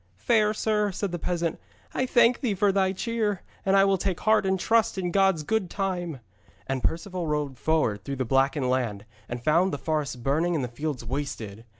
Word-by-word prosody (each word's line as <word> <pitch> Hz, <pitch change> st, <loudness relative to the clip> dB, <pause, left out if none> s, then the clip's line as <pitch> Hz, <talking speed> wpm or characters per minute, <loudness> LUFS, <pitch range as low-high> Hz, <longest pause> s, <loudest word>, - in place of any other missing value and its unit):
'Fair 215 Hz, -, +2 dB
sir,' 210 Hz, -1 st, 0 dB
said 195 Hz, 0 st, -3 dB
the 175 Hz, -, -3 dB
peasant, 170 Hz, -1 st, -2 dB, 0.3 s
'I 260 Hz, -, 0 dB
thank 240 Hz, 0 st, +4 dB
thee 225 Hz, -6 st, 0 dB
for 200 Hz, +1 st, +3 dB
thy 190 Hz, -1 st, +2 dB
cheer, 210 Hz, -1 st, -2 dB, 0.2 s
and 195 Hz, 0 st, +2 dB
I 195 Hz, -, +6 dB
will 195 Hz, -1 st, +2 dB
take 185 Hz, -2 st, -2 dB
heart 215 Hz, -2 st, +3 dB
and 190 Hz, 0 st, +1 dB
trust 225 Hz, +1 st, +2 dB
in 180 Hz, -2 st, -1 dB
God's 195 Hz, -4 st, +3 dB
good 210 Hz, +1 st, 0 dB
time.' 175 Hz, -8 st, -3 dB, 0.4 s
And 135 Hz, -1 st, -2 dB
Perceval 175 Hz, +1 st, -2 dB
rode 145 Hz, -4 st, -2 dB
forward 110 Hz, -8 st, +1 dB
through 140 Hz, +5 st, -4 dB
the 130 Hz, -1 st, -2 dB
blackened 135 Hz, +2 st, +2 dB
land 110 Hz, -6 st, -1 dB, 0.2 s
and 120 Hz, 0 st, -5 dB
found 170 Hz, +6 st, +3 dB
the 145 Hz, -, -2 dB
forests 150 Hz, -2 st, -2 dB
burning 150 Hz, +8 st, 0 dB
and 145 Hz, -, 0 dB
the -, -, -1 dB
fields 135 Hz, 0 st, -4 dB
wasted. 115 Hz, -5 st, -5 dB
170 Hz, 200 wpm, -26 LUFS, 135-195 Hz, 0.4 s, I